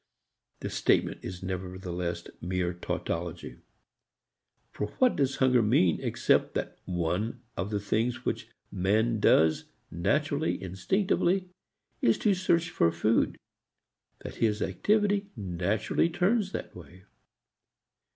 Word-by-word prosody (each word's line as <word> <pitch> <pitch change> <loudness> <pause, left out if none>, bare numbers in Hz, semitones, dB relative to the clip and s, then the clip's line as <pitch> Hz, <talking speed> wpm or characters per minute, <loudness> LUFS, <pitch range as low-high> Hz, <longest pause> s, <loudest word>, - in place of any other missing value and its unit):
The - - -4
statement - - +1
is 90 +1 -7
nevertheless 90 -1 -4 0.2
mere 90 0 -1
tautology. 85 -1 -4 1.1
For 105 - -3
what 255 -1 +4
does 135 -2 +1
hunger 125 -2 +4
mean 105 - +3
except - - +1
that - - -3
one 90 +5 -2
of 95 +1 -3
the 105 -1 -1
things 115 +4 -1
which - - -2 0.2
man 110 +5 +1
does 80 -5 +4 0.3
naturally, 145 - 0
instinctively, 180 - 0 0.5
is 115 - +4
to 205 - +2
search 175 -2 +1
for 85 - +3
food 105 +7 +1 0.9
that - - -7
his 110 -2 +1
activity 205 - +1
naturally 100 - 0
turns 195 +3 +1
that - - -6
way? 90 +2 -13
105 Hz, 110 wpm, -29 LUFS, -, 1.1 s, what